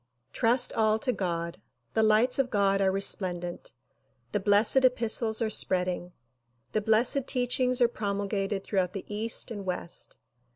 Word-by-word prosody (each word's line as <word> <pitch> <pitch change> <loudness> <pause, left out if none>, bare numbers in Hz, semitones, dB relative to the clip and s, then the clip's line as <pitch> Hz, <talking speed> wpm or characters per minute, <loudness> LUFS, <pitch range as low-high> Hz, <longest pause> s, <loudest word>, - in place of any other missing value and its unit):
Trust 240 +1 +2
all 215 -1 +2
to 250 +3 -1
God. 170 -4 -4 0.3
The 220 - +2
lights 220 +4 +3
of 265 -2 +1
God 195 -2 +1
are 190 -1 +2
resplendent. 180 -3 -2 0.6
The - - 0
blessed 205 +6 +3
epistles 230 -2 +2
are 220 - -1
spreading. 180 -3 -1 0.6
The 215 - 0
blessed 235 +5 +2
teachings 250 0 0
are 240 - +6
promul 200 -3 -3
gated 195 -1 -2
throughout 190 -3 -1
the 195 - -6
east 225 +3 -1
and 205 -3 -6
west. 180 -2 -6
215 Hz, 150 wpm, -28 LUFS, 195-235 Hz, 0.6 s, are